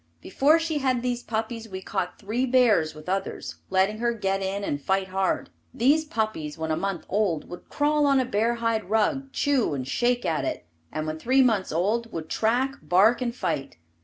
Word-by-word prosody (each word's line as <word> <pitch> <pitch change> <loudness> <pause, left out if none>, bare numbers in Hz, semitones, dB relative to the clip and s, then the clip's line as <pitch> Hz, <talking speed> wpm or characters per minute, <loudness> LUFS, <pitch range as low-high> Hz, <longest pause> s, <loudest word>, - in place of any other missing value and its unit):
Before 290 - +3
she 325 -2 -1
had 255 -3 0
these 245 -1 -1
puppies 225 0 -4
we 190 -1 -5
caught 190 -1 -3
three 230 +6 -1
bears 230 -12 +3
with 155 +2 -12
others, 195 +1 -3
letting 195 +3 +2
her 235 0 +1
get 195 -2 -1
in 195 +1 -2
and 145 -7 -2
fight 190 +4 0
hard. 190 0 -1 0.2
These 290 +6 +3
puppies 215 - -3
when 160 0 -3
a - - +2
month 190 +1 -3
old 190 -6 0
would 175 - -10
crawl 295 0 +2
on 275 -1 +4
a 260 - +1
bear 230 +1 +1
hide 230 -4 -1
rug, 270 +6 +1
chew 265 - +1
and 130 -2 -4
shake 245 - +1
at 155 -4 0
it, - - -3 0.3
and 155 0 -3
when 155 0 -4
three 260 +8 +4
months 220 -7 +1
old, 215 +8 0
would 160 -1 -6
track, 255 +5 +1
bark 215 +7 +4
and 240 -1 -2
fight. 135 - -3
220 Hz, 195 wpm, -26 LUFS, 185-250 Hz, 0.3 s, on